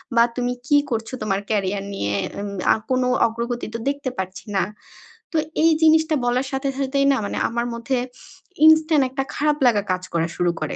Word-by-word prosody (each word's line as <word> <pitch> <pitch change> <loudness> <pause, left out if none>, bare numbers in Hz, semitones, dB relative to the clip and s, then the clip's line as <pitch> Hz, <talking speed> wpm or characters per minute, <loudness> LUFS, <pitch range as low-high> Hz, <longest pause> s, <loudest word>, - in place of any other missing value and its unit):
বা 235 - +7
তুমি 245 0 -1
কি 290 - +5
করছো 225 +2 -3
তোমার 195 -2 0
ক্যারিয়ার 200 -2 0
নিয়ে? 100 - -2 0.2
এম 205 0 -4 0.2
আ - - +1
কোনো 255 -1 +2 0.2
অগ্রগতি 235 +1 -4
তো - - -2
দেখতে 280 -1 -3
পারছি 190 +2 -5
না।" - - +3 0.7
তো - - -8 0.3
এই 330 - +6
জিনিসটা 315 0 +4
বলার 250 +2 +1
সাথে, 270 +1 -1
সাথেই 275 0 +1
না 270 - +2
মানে - - -4
আমার 235 +1 -2
মধ্যে 235 +3 -2 0.7
ইনস্ট্যান্ট 315 -2 +6
একটা 270 +1 -2
খারাপ 300 0 +1
লাগা 220 -4 +4
কাজ 185 0 -1
করা 165 0 +1
শুরু 175 -1 +1
করে। 155 - -3
245 Hz, 185 wpm, -22 LUFS, 205-275 Hz, 0.7 s, বা